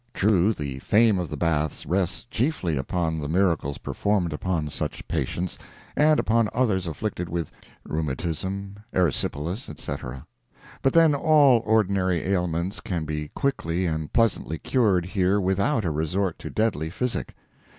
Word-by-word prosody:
True, 100 Hz, 0 st, +3 dB
the 70 Hz, -9 st, -4 dB
fame 105 Hz, -, +4 dB
of 90 Hz, -4 st, -3 dB
the 75 Hz, -, -5 dB
baths 75 Hz, -2 st, 0 dB
rests 95 Hz, 0 st, 0 dB
chiefly 120 Hz, -, -1 dB
upon 80 Hz, +3 st, -1 dB
the 75 Hz, -, -3 dB
miracles 80 Hz, -4 st, +1 dB
performed 100 Hz, -6 st, -1 dB
upon 80 Hz, -1 st, -1 dB
such 75 Hz, -, -4 dB
patients, 90 Hz, 0 st, -2 dB, 0.4 s
and 150 Hz, 0 st, +4 dB
upon 115 Hz, -1 st, +2 dB
others 105 Hz, -8 st, +1 dB
afflicted 90 Hz, +1 st, -3 dB
with 85 Hz, -1 st, -3 dB, 0.3 s
rheumatism, 85 Hz, +6 st, -3 dB, 0.2 s
erysipelas, 85 Hz, -, -1 dB
etc., 65 Hz, -3 st, -6 dB, 0.6 s
but 135 Hz, -, +2 dB
then 165 Hz, -2 st, +6 dB
all 145 Hz, -4 st, +5 dB
ordinary 100 Hz, -5 st, +2 dB
ailments 90 Hz, -1 st, -1 dB
can 85 Hz, -4 st, -3 dB
be 75 Hz, 0 st, -3 dB
quickly 90 Hz, -10 st, 0 dB
and 80 Hz, -2 st, -2 dB
pleasantly 110 Hz, -8 st, +1 dB
cured 100 Hz, -8 st, +2 dB
here 95 Hz, +1 st, +1 dB
without 100 Hz, +5 st, +1 dB
a 85 Hz, -, +1 dB
resort 80 Hz, +4 st, -1 dB
to -, -, -6 dB
deadly 105 Hz, -8 st, 0 dB
physic. 125 Hz, +8 st, -3 dB
90 Hz, 140 wpm, -25 LUFS, 80-105 Hz, 0.6 s, then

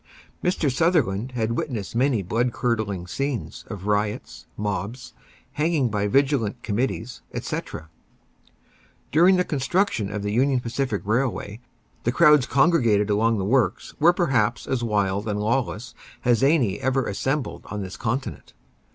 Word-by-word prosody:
Mr. 175 Hz, -5 st, +1 dB
Sutherland 130 Hz, -, +1 dB
has 115 Hz, -2 st, -1 dB
witnessed 115 Hz, -3 st, -3 dB
many 125 Hz, -4 st, +2 dB
blood 115 Hz, +7 st, 0 dB
curdling 110 Hz, -8 st, -1 dB
scenes 135 Hz, +6 st, -4 dB
of 100 Hz, -3 st, -7 dB
riots, 105 Hz, 0 st, -2 dB
mobs, 105 Hz, +4 st, -4 dB, 0.4 s
hanging 150 Hz, -4 st, +1 dB
by 105 Hz, -1 st, 0 dB
vigilant 130 Hz, -2 st, +1 dB
committees, 120 Hz, +2 st, -2 dB
etc. 80 Hz, -, -5 dB, 1.2 s
During 175 Hz, +5 st, +6 dB
the 180 Hz, -, +3 dB
construction 145 Hz, -, 0 dB
of 105 Hz, -1 st, -4 dB
the 105 Hz, -, -2 dB
Union 130 Hz, +4 st, +2 dB
Pacific 120 Hz, -2 st, -2 dB
Railway, 110 Hz, -2 st, -1 dB, 0.4 s
the 120 Hz, -, +1 dB
crowds 150 Hz, -2 st, +5 dB
congregated 120 Hz, -, +3 dB
along 110 Hz, +2 st, +2 dB
the 95 Hz, -, -1 dB
works 110 Hz, -4 st, +1 dB
were 165 Hz, +3 st, +6 dB
perhaps 125 Hz, -, +1 dB
as 130 Hz, -3 st, -1 dB
wild 100 Hz, -2 st, 0 dB
and 105 Hz, -1 st, -1 dB
lawless 120 Hz, +1 st, -1 dB, 0.3 s
as 120 Hz, -1 st, +3 dB
any 135 Hz, -9 st, +3 dB
ever 130 Hz, 0 st, 0 dB
assembled 135 Hz, +8 st, -2 dB
on 105 Hz, -1 st, -4 dB
this 95 Hz, -1 st, -7 dB
continent. 120 Hz, -, -4 dB
120 Hz, 135 wpm, -24 LUFS, 105-135 Hz, 1.2 s, During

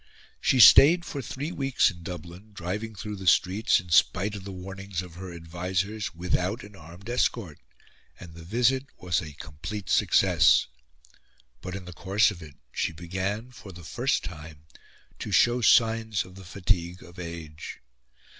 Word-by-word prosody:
She 130 Hz, -, +2 dB
stayed 170 Hz, +8 st, +8 dB
for 140 Hz, -, -5 dB
three 140 Hz, +6 st, -5 dB
weeks 135 Hz, -7 st, +2 dB
in 85 Hz, -1 st, -14 dB
Dublin, 90 Hz, +4 st, -9 dB
driving 100 Hz, +4 st, -5 dB
through 105 Hz, +1 st, -6 dB
the 95 Hz, -1 st, -7 dB
streets, 95 Hz, +5 st, +3 dB
in 90 Hz, -2 st, -11 dB
spite 95 Hz, +5 st, +3 dB
of 100 Hz, -2 st, -8 dB
the 100 Hz, -, -6 dB
warnings 95 Hz, 0 st, -6 dB
of 90 Hz, -2 st, -12 dB
her 90 Hz, +1 st, -8 dB
advisers, 90 Hz, +5 st, -3 dB
without 90 Hz, +5 st, -1 dB
an 105 Hz, 0 st, -13 dB
armed 85 Hz, +4 st, -13 dB
escort; 115 Hz, -8 st, -1 dB, 0.6 s
and 85 Hz, -2 st, -11 dB
the 85 Hz, -, -11 dB
visit 125 Hz, +8 st, +1 dB
was 90 Hz, -3 st, -1 dB
a 75 Hz, -2 st, -9 dB
complete 90 Hz, +6 st, -7 dB
success. -, -, +4 dB, 1.0 s
But, 90 Hz, +1 st, -6 dB
in 95 Hz, -2 st, -7 dB
the 90 Hz, -, -9 dB
course 100 Hz, +5 st, +2 dB
of 90 Hz, -3 st, -10 dB
it, 75 Hz, -3 st, -12 dB, 0.2 s
she -, -, -1 dB
began, 95 Hz, +8 st, -4 dB
for 105 Hz, -5 st, -12 dB
the 85 Hz, -1 st, -12 dB
first 120 Hz, -, -1 dB
time, 75 Hz, -2 st, -10 dB, 0.5 s
to -, -, -5 dB
show 120 Hz, +1 st, +4 dB
signs 110 Hz, -2 st, +3 dB
of 90 Hz, -, -14 dB
the 95 Hz, 0 st, -12 dB
fatigue 90 Hz, -1 st, -2 dB
of 85 Hz, +2 st, -14 dB
age. 85 Hz, -3 st, -8 dB
95 Hz, 165 wpm, -27 LUFS, 85-110 Hz, 1.0 s, stayed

